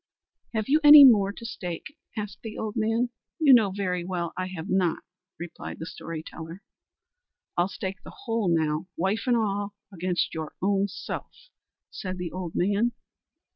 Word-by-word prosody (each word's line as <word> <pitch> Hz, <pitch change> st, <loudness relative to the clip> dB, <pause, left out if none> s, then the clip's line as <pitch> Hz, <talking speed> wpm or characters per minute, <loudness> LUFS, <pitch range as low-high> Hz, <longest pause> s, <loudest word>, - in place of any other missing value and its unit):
"Have 215 Hz, -1 st, -1 dB
you 300 Hz, +3 st, +4 dB
any 295 Hz, 0 st, +11 dB
more 205 Hz, -6 st, +6 dB
to 230 Hz, +3 st, -10 dB
stake?" 205 Hz, -, -6 dB, 0.2 s
asked 210 Hz, -2 st, -5 dB
the 220 Hz, -1 st, -7 dB
old 215 Hz, -1 st, -4 dB
man. 225 Hz, +2 st, +1 dB, 0.3 s
"You 300 Hz, -5 st, +6 dB
know 225 Hz, -5 st, +6 dB
very 185 Hz, -2 st, -2 dB
well 175 Hz, -2 st, -3 dB
I 185 Hz, 0 st, -3 dB
have 185 Hz, -2 st, -7 dB
not," 185 Hz, -5 st, +1 dB, 0.3 s
replied 170 Hz, 0 st, -7 dB
the 160 Hz, -, -6 dB
story 165 Hz, -1 st, -7 dB
teller. 165 Hz, +3 st, -9 dB, 0.9 s
"I'll 175 Hz, +1 st, +2 dB
stake 190 Hz, -1 st, -6 dB
the -, -, -10 dB
whole 225 Hz, -5 st, 0 dB
now, 160 Hz, 0 st, +1 dB
wife 190 Hz, +8 st, -1 dB
and 245 Hz, -1 st, +4 dB
all, 205 Hz, -2 st, -1 dB, 0.2 s
against 180 Hz, 0 st, -1 dB
your 160 Hz, -1 st, -5 dB
own 200 Hz, +1 st, +1 dB
self," -, -, -8 dB, 0.4 s
said 185 Hz, -3 st, -5 dB
the 180 Hz, -2 st, -4 dB
old 180 Hz, -2 st, -5 dB
man. 205 Hz, +6 st, +1 dB
195 Hz, 165 wpm, -26 LUFS, 175-220 Hz, 0.9 s, any